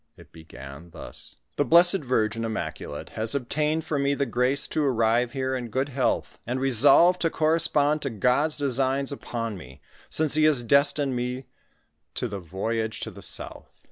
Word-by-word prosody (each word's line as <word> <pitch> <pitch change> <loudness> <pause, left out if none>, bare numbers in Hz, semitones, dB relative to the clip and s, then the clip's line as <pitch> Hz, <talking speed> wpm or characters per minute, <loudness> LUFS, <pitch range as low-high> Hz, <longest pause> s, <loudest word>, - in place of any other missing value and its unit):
It - - -17
began 80 0 -12
thus: - - -11
— - - -52
" - - -47
The - - +3
Blessed 175 +7 +6
Virgin 115 -5 -1
Immaculate 110 -9 -5
has 110 +4 -3
obtained 150 +4 -1
for 145 - -2
me 140 0 +1
the 140 - -1
grace 130 +2 0
to 155 - -1
arrive 120 -2 +1
here 130 -1 -2
in 125 -2 -4
good 130 +5 -2
health, 130 -1 -2
and 125 +2 -2
resolved 140 +8 +5
to 165 - +2
corre 160 +1 +1
spond 150 -1 +1
to 140 - -3
God's 125 +7 +1
designs 135 0 0
upon 115 -6 -5
me, 65 -3 -13 0.3
since 155 -2 +1
he 155 0 +3
has 145 -6 +3
destined 140 +1 +2
me 125 +2 -4 0.7
to 125 - -2
the 100 -3 -6
voyage 110 +5 -3
to - - -5
the - - -13
south. - - -5
130 Hz, 180 wpm, -25 LUFS, 115-145 Hz, 0.7 s, Blessed